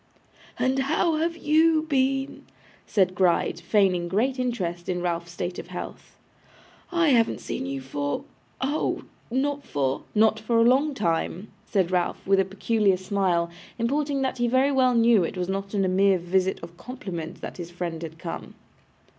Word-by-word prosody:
'And 260 +1 +1
how 315 +4 +1
have 330 +1 -1
you 315 0 +3
been?' 270 -2 0 0.4
said 185 -3 +2
Gride, 180 -2 +2
feigning 185 -5 +2
great 245 +9 0
interest 180 -9 -2
in 180 -1 0
Ralph's 170 -1 -2
state 175 +1 -4
of - - -8
health. - - -8 0.7
'I 340 -3 +3
haven't 230 -4 +3
seen 135 - -4
you 135 0 -4
for 145 +2 -3 0.4
oh! 280 +4 -1 0.3
not 280 +3 -1
for 135 -2 -1
' - - -33
'Not 220 +1 +4
for 230 +2 0
a 230 - +6
long 270 +5 +3
time,' 175 +1 -1 0.2
said 185 -4 +1
Ralph, 180 -1 -1
with 195 0 +4
a 195 - +3
peculiar 195 0 +1
smile, 185 -3 0 0.3
importing 275 +3 0
that 260 -1 -2
he 240 - +2
very 260 +3 +3
well 255 -2 +3
knew 230 -4 +5
it 170 - -4
was 180 0 -2
not 195 +1 -3
on 195 -1 +2
a - - +1
mere 190 +1 +4
visit 185 +2 0
of 170 +1 -10
compliment 175 -8 -7
that - - -7
his 175 -2 -6
friend 175 -2 -4
had 160 -1 -7
come. 165 0 -7
200 Hz, 170 wpm, -25 LUFS, 175-260 Hz, 0.7 s, a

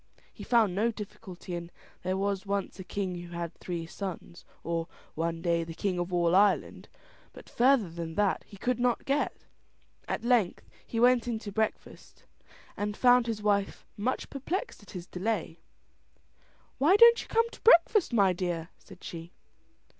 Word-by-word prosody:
He - - -10
found 225 -6 +3
no 215 +5 +1
difficulty 200 -4 -8
in 170 0 -5 0.3
"there 185 +1 -1
was 195 -1 -1
once 200 0 -3
a - - -5
king 185 -1 -4
who 175 0 -10
had 170 -1 -4
three 170 -2 -5
sons" 175 -1 -7 0.2
or 165 0 -2 0.3
"one 165 +1 -3
day 170 -1 +1
the 165 0 -8
king 185 -1 -1
of 175 +1 -3
all 175 0 +2
Ireland," 200 0 +2 0.4
but - - -13
further 250 -4 +3
than 165 -1 -6
that 205 0 +1
he 200 - -13
could 250 +5 -1
not 245 -1 +1
get. 280 +2 -1 0.6
At - - -3
length 235 -7 +1 0.2
he 230 - -3
went 245 0 +4
in 235 -2 -1
to 210 -2 -7
breakfast, 220 +1 -4 0.5
and 205 0 -3
found 245 -1 +5
his 215 -2 -3
wife 200 -1 0
much 245 +6 -2
perplexed 335 - -4
at 205 - -17
his 180 -2 -7
delay. 180 -3 -3 1.2
"Why 315 +8 +5
don't 470 +2 +8
you - - -11
come 460 +1 +2
to - - -14
breakfast, 415 - +5
my 200 -5 +4
dear?" 175 -2 -3
said 185 - -16
she. 170 +1 -8
200 Hz, 170 wpm, -29 LUFS, 175-235 Hz, 1.2 s, don't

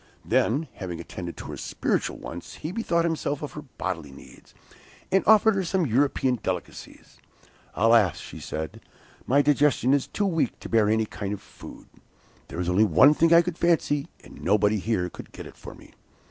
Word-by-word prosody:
Then 145 +8 +1
having 90 -3 -6
attended 85 0 -7
to - - -8
her - - -7
spiritual - - -2
wants, 85 +1 -9
he 155 - -6
bethought 175 -5 0
himself 155 -3 -2
of 150 - -5
her 150 - -8
bodily 90 - -5
needs, 65 - -16 0.6
and 195 - +3
offered 220 +1 +6
her 195 -1 -1
some 180 0 0
European 130 -1 +1
delicacies. 90 -2 -6 0.6
'Alas,' 115 -5 +4 0.2
said 80 0 -5
she, - - -32 0.4
'my 140 +3 +4
digestion 140 -3 +3
is 140 -2 +1
too 205 - -2
weak 165 - 0
to - - -9
bear 110 -2 +3
any 110 0 +2
kind 100 -1 -5
of 105 - -5
food. - - -13 0.6
There 85 - -7
is 90 - -2
only 90 +4 +3
one 110 - +6
thing 165 +2 +2
I 170 0 +7
could 175 -1 -5
fancy, 155 -4 +1 0.2
and - - -13
nobody 105 +2 +2
here 95 -3 -1
could - - -11
get - - -9
it - - -12
for - - -11
me. - - -17
130 Hz, 185 wpm, -25 LUFS, 100-160 Hz, 0.6 s, I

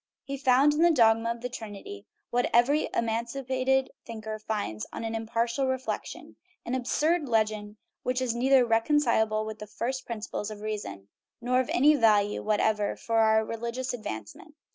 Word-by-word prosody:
He 275 - -5
found 275 +2 +4
in 300 - 0
the 345 - +6
dogma 230 -6 +4
of 235 0 -3
the 250 - -2
Trinity 200 - -9 0.2
what 245 0 +1
every 275 +6 +3
emancipated 255 +3 0
thinker 220 -1 -6
finds 205 - -4
on - - -6
impartial 230 +3 -1
reflection 260 0 -4 0.3
an 240 - -3
absurd 295 +5 0
legend 215 -2 0 0.2
which 250 0 -1
is 255 -3 -1
neither 255 +1 +4
reconcilable 225 -3 +2
with 220 0 -7
the 210 - -8
first 245 +5 -4
principles 215 -2 -4
of 210 -1 -9
reason 200 - -5 0.3
nor 250 +1 +1
of 260 - -1
any 295 +4 +5
value 210 -6 +3
whatever 210 -1 +1
for 225 -1 -1
our 220 0 +4
religious 235 +3 -4
advance 110 - -6
ment. 305 - -16
230 Hz, 160 wpm, -28 LUFS, 215-260 Hz, 0.3 s, the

